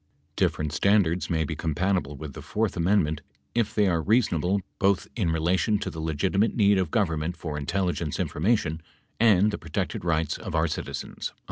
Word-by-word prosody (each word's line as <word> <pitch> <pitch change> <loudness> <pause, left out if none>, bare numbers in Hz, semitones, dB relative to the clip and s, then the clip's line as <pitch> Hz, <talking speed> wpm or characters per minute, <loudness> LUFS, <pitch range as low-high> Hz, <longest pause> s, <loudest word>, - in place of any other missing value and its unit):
Different 75 -2 0
standards 95 -3 +2
may 80 -2 +1
be 80 +1 -4
compatible 80 0 -1
with 75 -1 -7
the - - -8
fourth 110 -1 -1
amend 95 +3 +3
ment 75 0 -3 0.3
if 115 -3 0
they 105 - +4
are 85 -3 +1
reasonable 100 -2 +2 0.2
both 100 -1 +2
in 95 -8 0
relation 90 +6 +1
to - - -4
the 80 - -8
legitimate 90 +7 0
need 100 -3 +4
of 90 -4 0
Government 85 -5 0
for 80 -2 -5
intelligence 85 +1 -2
information 80 -3 0 0.4
and 105 -2 +5
the 105 - -4
protected 80 +1 -3
rights 80 -3 0
of - - -5
our 80 0 +3
citizens." 75 - -5
85 Hz, 170 wpm, -26 LUFS, 80-100 Hz, 0.4 s, and